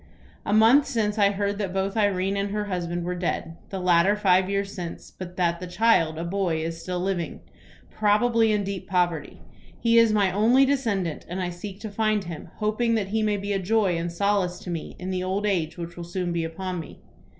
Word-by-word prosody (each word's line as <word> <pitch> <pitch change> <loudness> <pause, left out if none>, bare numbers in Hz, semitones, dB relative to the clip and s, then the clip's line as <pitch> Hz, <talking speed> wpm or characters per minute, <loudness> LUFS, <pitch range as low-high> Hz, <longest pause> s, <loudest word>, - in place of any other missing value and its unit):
"A - - 0
month 225 +7 +6
since 215 -2 -1
I 200 -1 +5
heard 200 0 -2
that 195 -3 -3
both 195 +2 -1
Irene 200 -2 +1
and 200 0 -1
her 210 +1 -2
husband 175 -3 -3
were 180 +1 -2
dead, 175 -2 -3
the 195 - -4
latter 180 +2 +4
five 190 -2 +3
years 200 0 -1
since, 175 -3 -7
but 180 -1 -9
that 170 -2 +1
the 180 - -6
child, 175 -5 +2
a 165 - -3
boy, 170 -3 -1
is 165 0 -5
still 180 0 -3
living, 180 -2 -2 0.5
probably 225 +2 +3
in 210 -1 +1
deep 195 -1 -5
poverty. 175 -5 -1 0.4
He 230 0 +4
is 230 -1 +5
my 200 -3 +3
only 235 +8 +4
descendant, 215 - -1
and 180 +2 -4
I 180 -1 -2
seek 190 +3 -8
to 215 - -6
find 215 0 +1
him, 170 -2 -8
hoping 225 +2 0
that 200 -3 -1
he 220 +2 0
may 210 -1 +1
be 200 +1 -3
a 195 - 0
joy 195 -1 +2
and 170 +1 -2
solace 190 0 0
to 180 - -6
me 165 -2 -5
in 185 +1 -5
the 185 -1 -1
old 190 +3 -1
age 170 -6 0
which 170 0 -6
will 175 - -6
soon 175 0 -3
be 170 -1 -1
upon 180 +2 -4
me. 160 - -9
190 Hz, 215 wpm, -25 LUFS, 175-210 Hz, 0.5 s, month